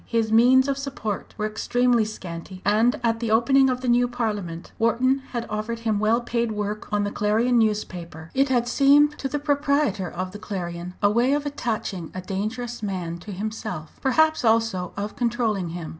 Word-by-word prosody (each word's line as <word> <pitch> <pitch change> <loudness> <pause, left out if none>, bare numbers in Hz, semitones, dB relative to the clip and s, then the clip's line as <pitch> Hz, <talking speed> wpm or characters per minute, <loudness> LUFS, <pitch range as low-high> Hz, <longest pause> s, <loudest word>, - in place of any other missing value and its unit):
His 225 -2 0
means 255 +4 +6
of 275 -1 -1
support 270 -7 -5
were 210 - -1
extremely 240 +2 +1
scanty, 185 -2 -8
and 220 +4 +3
at 225 -1 +1
the 230 -1 -2
opening 265 +5 +4
of 255 0 -1
the 255 - -3
new 245 0 +4
Parliament 210 -8 -4
Wharton 250 +4 +2
had 235 -2 -3
offered 220 +2 -4
him 220 -3 0
well 220 +3 +2
paid 235 -1 -1
work 210 0 -4
on 205 0 +1
the 205 - -2
Clarion 225 +4 +2
newspaper. 175 -7 -2
It 275 +1 +2
had 240 -2 +2
seemed 285 +4 +5
to 270 - -2
the 295 - -1
proprietor 285 - 0
of 185 +1 -5
the 210 - -9
Clarion 180 -3 -5
a 205 - +5
way 240 +5 +3
of 295 0 0
attaching 220 - -3
a 185 - -4
dangerous 220 +6 -4
man 180 -5 -4
to 205 +4 -9
himself, 200 -5 -5
perhaps 315 +3 +3
also 225 -6 +1
of 205 +1 -4
controlling 230 -6 0
him. 170 -1 -6
225 Hz, 185 wpm, -24 LUFS, 200-245 Hz, -, means